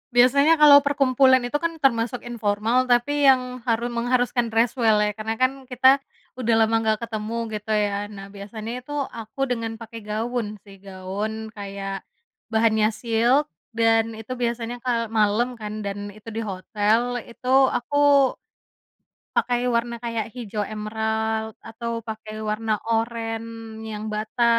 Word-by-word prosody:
Biasanya 280 +6 +5
kalau 285 -1 +9
perkumpulan 265 -2 +4
itu 245 - -6
kan 335 +3 0
termasuk 240 -3 +1
informal 225 +1 +1
tapi 255 +4 +2
yang 255 -2 +3
haru 235 0 0
mengharuskan 245 0 0
dress 230 +1 +2
well 225 -4 +3
ya 210 -1 +1
karena 220 +1 -4
kan 265 +1 +1
kita, 260 +2 +4 0.3
udah 240 -2 0
lama 225 0 +3
gak 220 -1 +1
ketemu 220 0 -4 0.2
gitu 210 +1 -5
ya. 205 -1 0
Nah, 195 -1 -9
biasanya 205 +3 -7
itu 290 - -11 0.2
aku 230 +5 -4
dengan 230 -2 -3
pakai 230 -1 -9
gaun 215 0 -3
sih 195 -1 -15
gaun 200 +3 -5
kayak, 195 -1 -5 0.5
bahannya 220 -1 +3
silk 235 +6 +2 0.2
dan 225 0 +2
itu 225 +3 -7
biasanya 240 0 -3
kalau 235 -2 0
malam 220 +3 +1
kan 215 -1 -6
dan 205 0 -5
itu 215 +2 -17
di 225 - -2
hotel 215 +5 0
itu 235 +1 -12 0.2
aku 285 +1 +3 1.0
Pakai 245 0 +1
warna 235 0 0
kayak 230 -2 -2
hijau 220 -4 -5
emerald 220 +1 -2
atau 230 0 -5
pakai 220 0 -7
warna 215 +1 -1 0.2
oranye 225 -1 -3
yang 210 +1 -6
bata 215 +3 -2
225 Hz, 140 wpm, -24 LUFS, 215-245 Hz, 1.0 s, kalau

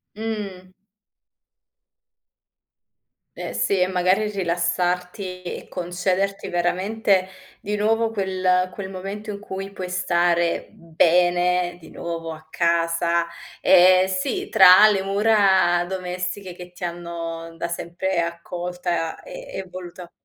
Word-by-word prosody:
Mh. 205 -4 -5 2.7
Eh - - -5
sì, 200 - +1
e - - +5
magari 185 +3 +1
rilassarti 180 0 -2
e 175 - -6
concederti 185 +2 -2
veramente 185 +2 +1 0.3
di 210 +1 -3
nuovo 225 +2 +1
quel 185 -3 0
quel 195 -2 -6
momento 195 +3 -7
in 205 - -4
cui 195 -1 -6
puoi 185 -2 -6
stare 175 -1 +1
bene 175 +1 +2
di 165 - -14
nuovo 165 -1 -5
a 155 0 -14
casa. 170 0 +1 0.3
Ehm, 185 0 +6
sì, 185 -1 -2
tra 190 +1 +8
le 195 -2 0
mura 195 -4 +3
domestiche 180 0 -4
che 180 0 -11
ti 180 - -12
hanno 170 -1 -5
da 170 - -3
sempre 170 +1 -2
accolta 170 0 -3
e - - -10
e 190 - -4
voluta 180 -1 -9
180 Hz, 115 wpm, -23 LUFS, 175-195 Hz, 2.7 s, tra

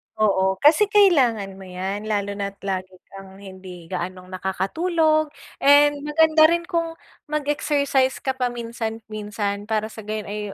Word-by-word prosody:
Oo, 190 -3 +2
kasi 325 +8 +6
kailangan 250 - +3
mo 190 - -11
yan 190 +3 -5
lalo 205 -2 -1
na't 200 -1 -5
lagi 185 -1 -4 0.2
kang 195 0 -12
hindi 185 -3 -11
gaanong 185 +1 -5
nakakatulog 310 - 0 0.3
and 290 +1 +5
maganda 315 +1 +4
rin 340 0 +1
kung 335 -2 -2 0.3
mag-exercise 285 -3 0
ka 265 - 0
paminsan-minsan 220 -4 -4
para 220 0 -1
sa 220 - -9
gayon 215 0 -5
ay 210 +1 -5
220 Hz, 130 wpm, -22 LUFS, 195-295 Hz, 0.3 s, kasi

